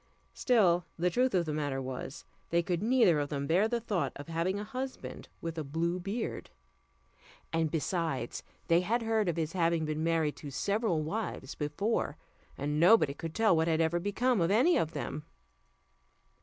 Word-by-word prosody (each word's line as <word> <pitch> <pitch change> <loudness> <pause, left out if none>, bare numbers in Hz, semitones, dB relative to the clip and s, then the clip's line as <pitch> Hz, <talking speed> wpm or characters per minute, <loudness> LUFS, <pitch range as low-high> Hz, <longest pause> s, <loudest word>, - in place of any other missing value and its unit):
Still 185 -8 +3
the 175 +1 +1
truth 250 +2 +2
of 175 -2 +2
the 155 - -2
matter 145 -3 -1
was, 130 +2 -6 0.2
they 170 0 +2
could 175 -1 -1
neither 225 -8 +4
of 145 0 -2
them 140 -2 -2
bear 180 +8 +3
the 235 +1 -1
thoughts 210 -6 -1
of 145 +3 -9
having 170 +4 -1
a - - -4
husband 255 +4 -6
with 165 -1 -4
a - - -2
blue 165 +5 -1
beard; 200 +6 -4 1.0
and 165 -1 +1
besides, 160 -4 -2 0.3
they 170 +1 +4
had 230 +6 0
heard 220 -4 +1
of 170 - -1
his 160 -1 -2
having 170 -3 +1
been 155 +1 -2
married 165 -2 +1
to 145 - -8
several 200 - 0
wives 160 -6 -4
before, 150 +1 -1 0.4
and 145 +2 -1
nobody 175 -4 +6
could 160 +2 -7
tell 220 -5 +4
what 160 0 +2
had 160 -1 +2
ever 165 +1 +2
become 205 +4 +1
of 165 - +2
any 255 - +4
of 160 0 0
them. 150 +1 -4
170 Hz, 180 wpm, -31 LUFS, 155-210 Hz, 1.0 s, nobody